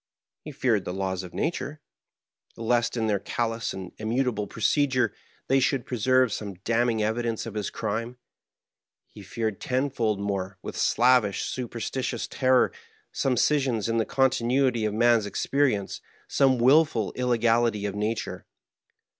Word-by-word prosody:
He - - -7
feared - - +1
the 90 - -5
laws 95 -1 -2
of 90 -2 -9
nature, 155 - -3 0.8
lest, 115 +1 0
in 115 - 0
their 105 -2 +1
callous 115 +3 -2
and 95 -2 -7
immutable 110 -1 -1
procedure, 125 0 +1 0.3
they 135 +1 +3
should 135 -1 0
preserve 130 0 +2
some 100 -3 -5
damning 115 -1 +1
evidence 115 +1 -1
of 115 - -6
his 105 -2 -3
crime. 115 +4 -4 0.9
He 105 - -14
feared 110 +1 -4
tenfold 125 -5 0
more, 100 -1 -3
with - - -6
a - - -5
slavish, 120 -5 +3
superstitious 120 0 -3
ter 130 -1 +3
ror, - - -27 0.4
some 130 -2 0
scission 130 -2 +2
in 115 0 0
the 110 - +1
continuity 130 -2 +2
of 105 - -1
man's 115 -2 +3
experience, 125 -3 0 0.3
some 135 -2 +3
willful 130 -3 +3
illegality 115 -3 +1
of 100 - -2
nature. 105 +2 -3
115 Hz, 140 wpm, -26 LUFS, 105-130 Hz, 0.9 s, they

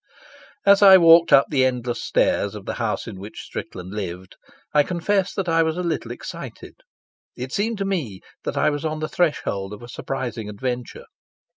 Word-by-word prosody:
As 200 +1 +6
I 195 -2 +10
walked 165 -1 +6
up 135 - +7
the 135 -3 +3
endless 125 -2 -1
stairs - - +1
of - - -9
the - - -3
house - - -1
in 95 - -8
which 105 +3 -9
Strickland 90 +1 -7
lived, 95 -3 -6 0.4
I 150 - +6
confess 185 +4 0
that 195 -2 -2
I 165 0 +3
was 160 0 0
a 180 - -2
little 160 -8 -2
excited. 120 - -8 0.6
It 130 +2 -6
seemed 220 +2 -1
to 195 - -2
me 150 - -3 0.2
that - - -4
I - - +3
was 145 +1 -4
on 155 -1 -2
the 155 - -2
threshold 105 - -1
of 105 - -10
a - - -9
surprising 120 -3 -5
adventure. 125 +3 -5
140 Hz, 185 wpm, -22 LUFS, 115-175 Hz, 0.6 s, I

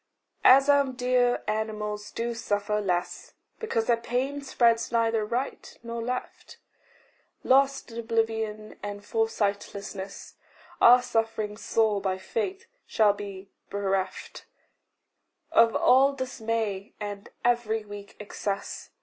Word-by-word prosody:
As 270 +2 +7
our 285 -1 +5
dear 250 -1 +1
animals 210 -1 -3
do 235 +1 -3
suffer 210 -1 -1
less 180 -3 -3 0.2
Because 230 - -1
their 235 - +4
pain 255 +5 -2
spreads 235 -4 +2
neither 230 -1 +2
right 245 +6 -4
nor 235 0 -5
left, 250 +2 -5 0.9
Lost 270 -1 +3
in 230 - -6
oblivion 225 -2 -2
and 205 0 -6
foresightlessness 200 -3 -3 0.4
Our 245 +1 +8
suffering 225 -3 -1
sore 215 -1 +1
by 190 -1 -1
faith 400 - -3 0.2
shall 210 -2 +4
be 200 -1 -8 0.2
bereft 195 -2 -3 1.0
Of 230 -1 +5
all 270 +2 +5
dismay, 225 -6 -3
and 205 -1 -6 0.2
every 225 -3 +1
weak 205 -1 -10
excess. 200 -1 -5
225 Hz, 110 wpm, -27 LUFS, 205-245 Hz, 1.0 s, Our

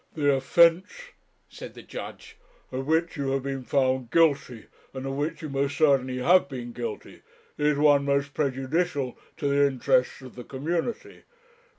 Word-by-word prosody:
'The 145 -2 +2
offence,' 170 - +2 0.4
said - - -11
the - - -11
judge, - - -9 0.4
'of 130 +1 -4
which 165 +2 +1
you 140 -1 -2
have 135 -1 -1
been 135 -1 -4
found 130 -2 0
guilty, 140 -8 +1 0.3
and 130 0 -5
of 135 - -3
which 145 +4 -3
you 155 - -5
most 140 +1 -2
certainly 135 -5 +2
have 165 +4 +3
been 120 -3 -6
guilty, 120 0 -7 0.3
is 150 -1 +1
one 145 -1 +4
most 140 0 0
prejudicial 140 0 -1 0.2
to 145 - -2
the 140 0 +3
interests 130 0 0
of 130 - -11
the 125 - -9
community. 165 - -4
140 Hz, 160 wpm, -26 LUFS, 130-155 Hz, 0.4 s, one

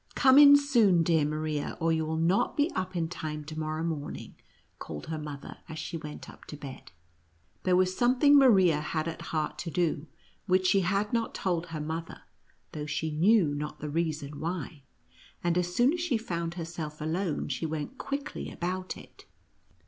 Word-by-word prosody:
" - - -23
Come 265 0 +6
in 285 -1 +10
soon, 230 -12 +4
dear 160 -2 +3
Maria, 155 0 -2
or 165 -1 +2
you 160 -1 0
will 160 0 -1
not 170 +4 +1
be 295 +3 +2
up 185 0 -3
in 165 -2 0
time 155 -3 -5
to 155 +1 -6
morrow 155 +1 -2
morning," 160 -3 -4 0.5
called 75 -2 -7
her 160 -1 -4
mother, 145 -2 -8
as 160 - -6
she 160 - -5
went 150 -2 -7
up - - -14
to 150 - -8
bed. 140 -2 -10 0.7
There 185 -1 +4
was 185 0 +2
something 255 +5 +4
Ma 275 -2 +8
ria 185 -9 +5
had 155 +1 -2
at 165 - -5
heart 155 -1 -2
to 170 - -4
do, 160 -2 -1 0.4
which 185 0 +3
she 195 +2 +4
had 195 +4 0
not 230 -1 -1
told 175 -2 -1
her 165 -2 -5
mother, 160 +2 -5 0.5
though 150 -1 -5
she 150 +1 -2
knew 170 0 +4
not 150 +1 -5
the 150 -1 -5
reason 150 -3 -2
why; 165 -2 -4 0.6
and 175 -1 +1
as 180 0 -1
soon 250 +5 +4
as 350 - -2
she 320 -9 +1
found 170 -6 -4
herself 165 -3 -6
alone 160 +1 -2
she 140 +4 -2
went 160 - -5
quickly 280 +2 -4
about 185 +1 -4
it. - - -15
165 Hz, 190 wpm, -29 LUFS, 155-185 Hz, 0.7 s, in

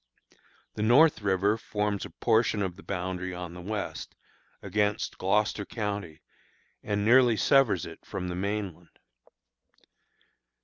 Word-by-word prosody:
The - - -5
North 130 +6 +5
River 100 +2 +1
forms 105 -2 -2
a - - -8
portion 110 -3 +1
of 95 - -1
its 95 - -16
boundary 90 -1 -3
on 90 -1 -6
the 90 - -9
west, 105 +2 -5 0.5
against 105 +1 -1
Gloucester 105 +2 +1
county, 100 -8 -5 0.6
and 105 -1 -1
nearly 120 -1 +5
severs 125 - +3
it 85 0 -11
from 95 -3 -5
the 90 - -4
mainland. 95 -3 -4
100 Hz, 125 wpm, -28 LUFS, 90-105 Hz, 0.6 s, North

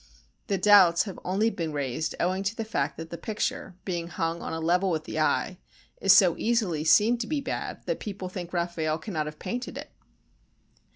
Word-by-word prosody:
The 200 - +1
doubts 185 -3 +6
have 195 -3 -7
only 205 +5 +1
been 165 -6 -4
raised 145 +2 -2
owing 185 +2 0
to 205 +3 -1
the 225 - -4
fact 145 -10 -2
that 165 0 -8
the 170 - -6
picture, 220 +1 -3
being 175 -3 -3
hung 165 0 -2
on - - -5
a 160 - -3
level 180 +4 +2
with 160 -3 -1
the 155 - -4
eye, 175 +4 +1 0.4
is 195 - +5
so 190 -3 +6
easily 210 -10 +1
seen 220 +8 +4
to 230 - -3
be 305 -1 -1
bad 275 - -5
that - - -2
people 195 -3 -5
think 180 -2 -7
Raffaelle 170 -3 -1
cannot 160 -3 -3
have 150 0 -7
painted 245 +8 -5
it. - - -8
180 Hz, 195 wpm, -27 LUFS, 165-210 Hz, 0.4 s, doubts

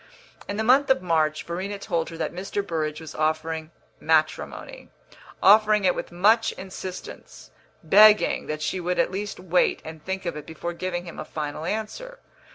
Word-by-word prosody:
In 200 - -4
the 220 - 0
month 265 +5 +4
of 265 -9 +3
March 155 -3 +1
Verena 190 +4 -4
told 170 -4 -2
her 165 - -9
that - - -3
Mr. 195 +3 -3
Burrage 155 -3 -2
was 160 -1 -9
offering 155 0 -1 0.3
matrimony 160 - -1 0.5
offering 210 0 +6
it 180 - +4
with - - -6
much 215 +6 +3
insistence, 185 -1 -9 0.3
begging 210 +5 +5
that 155 0 -4
she 150 +5 -1
would 180 +1 -2
at - - +2
least 200 +1 -5
wait 180 0 +1
and 160 -1 -9
think 190 0 -4
of 170 -3 -3
it 150 - -8
before 165 +2 -5
giving 175 0 -4
him 170 - -9
a - - -3
final 150 0 -5
answer. 220 - -4
180 Hz, 170 wpm, -25 LUFS, 160-205 Hz, 0.5 s, offering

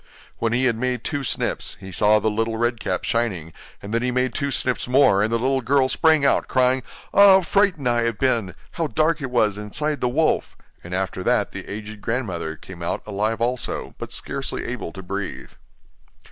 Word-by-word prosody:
When 115 - 0
he 125 +2 +2
had 120 -3 +2
made 125 -1 -2
two 145 -3 -2
snips, - - -2
he 95 - -9
saw 105 +3 +4
the 105 +1 0
little 115 +1 -1
Red 120 0 0
Cap - - -2
shining, 95 -9 -1 0.3
and 100 +2 -6
then 115 - +1
he 125 - 0
made 125 0 0
two 140 - -1
snips 125 -1 -1
more, 125 -6 +4
and 110 +2 +1
the 115 - +2
little 130 +3 +1
girl 130 +2 +2
sprang 155 +1 +3
out, - - +3
crying: 130 0 +3 0.3
'Ah, - - +2
how 190 - +6
frightened 180 -7 +2
I 120 -1 +2
have 115 -3 -1
been! 115 -9 0 0.2
How 165 -2 -2
dark 155 +1 +1
it 135 - -3
was 110 -4 +1
inside 150 +8 -2
the 125 - +1
wolf'; 155 +5 0 0.3
and 90 +1 -5
after 95 -1 -2
that - - +2
the - - -8
aged 105 0 -7
grandmother 95 -10 -3
came 90 +2 -12
out 85 - -2
alive 110 +2 -1
also, 125 +1 -2
but - - -7
scarcely - - -4
able - - -4
to 95 +1 -9
breathe. 95 -8 -5
120 Hz, 200 wpm, -23 LUFS, 105-130 Hz, 0.3 s, how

